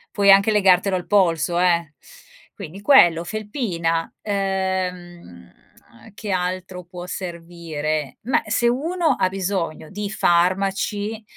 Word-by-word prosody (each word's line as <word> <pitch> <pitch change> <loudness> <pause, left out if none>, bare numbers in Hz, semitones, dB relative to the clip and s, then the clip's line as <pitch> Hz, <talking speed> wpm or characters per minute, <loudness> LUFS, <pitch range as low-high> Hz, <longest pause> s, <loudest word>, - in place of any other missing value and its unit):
Puoi 200 -1 +3
anche 200 +2 +6
legartelo 190 -2 +3
al 175 - -8
polso 175 -3 +2
eh. 170 -4 +1 0.6
Quindi 195 0 -10
quello, 175 - +5
felpina, 175 - -3
uhm, 185 - -4 0.6
che 210 -1 -6
altro 180 0 -3
può 175 0 -9
servire? 165 -5 -5
Beh, 250 +4 0
se 240 - +1
uno 315 +4 0
ha 185 - +1
bisogno 185 -5 -3
di 205 0 -5
farmaci, 195 +5 0
185 Hz, 110 wpm, -21 LUFS, 170-205 Hz, 0.6 s, anche